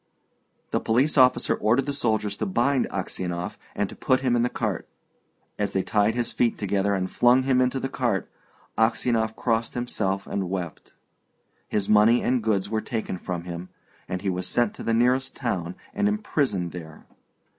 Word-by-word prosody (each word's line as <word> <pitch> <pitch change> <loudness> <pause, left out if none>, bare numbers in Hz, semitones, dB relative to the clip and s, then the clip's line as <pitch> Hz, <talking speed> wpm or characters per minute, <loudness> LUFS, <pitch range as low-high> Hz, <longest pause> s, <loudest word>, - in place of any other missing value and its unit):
The - - +1
police 130 +7 +2
officer 125 -3 +5
ordered 120 +5 +2
the 145 - -2
soldiers 110 -6 0
to 110 - -2
bind 120 +6 +1
Aksionov 90 +3 -3 0.2
and 105 - 0
to - - -10
put 130 -1 +1
him 125 -2 +2
in 120 - +2
the 120 - +2
cart. - - -3 0.7
As 105 - -1
they 95 - +1
tied 105 +1 +2
his 120 -1 -1
feet 120 -2 +1
together 100 0 0
and 95 -1 -1
flung 125 +2 +4
him 130 -1 +3
into 130 +1 +1
the 135 - -2
cart, 120 -7 -1 0.5
Aksionov 110 0 +2
crossed 115 -1 -1
himself 100 -5 -1
and 95 -3 -3
wept. 90 -3 -5 0.7
His 100 -2 -1
money 105 +3 +5
and 125 -1 +2
goods 105 -3 +1
were 110 +1 -1
taken 110 -6 -4
from 90 -2 -4
him, 90 +1 -7 0.4
and 90 +1 -4
he 100 - 0
was 90 0 -3
sent 120 +2 +1
to - - -10
the 115 - +1
nearest 125 +3 +2
town 90 0 -2 0.2
and 205 - +1
imprisoned 140 - 0
there. 80 -3 -10
110 Hz, 175 wpm, -25 LUFS, 95-125 Hz, 0.7 s, officer